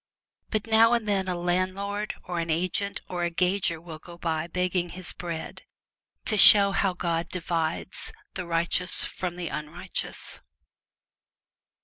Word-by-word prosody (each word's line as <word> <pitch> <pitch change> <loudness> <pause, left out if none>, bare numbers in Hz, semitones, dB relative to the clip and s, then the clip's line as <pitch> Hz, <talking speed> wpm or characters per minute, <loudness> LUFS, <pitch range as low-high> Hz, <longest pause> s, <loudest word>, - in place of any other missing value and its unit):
But 215 -1 -1
now 225 +1 +5
and 230 -3 0
then 195 -2 0
a 180 - -1
landlord 185 +4 -1
or 175 -1 -4
an 165 0 -3
agent 185 +5 -1
or 175 -1 -4
a 175 - +1
gauger 180 -1 0
will 160 -1 -10
go 170 +1 -12
by 160 -1 -2
begging 180 0 -1
his 180 +1 -7
bread, 165 -1 -6 0.6
to 215 -3 +1
show 200 -1 +9
how 195 -1 +1
God 170 -2 -2
divides 170 -1 -3 0.2
the 180 -2 -5
righteous 170 +2 +2
from 180 -2 -4
_ - - -14
the 175 -3 -4
unrighteous. 150 +5 -6
180 Hz, 145 wpm, -26 LUFS, 170-195 Hz, 0.6 s, show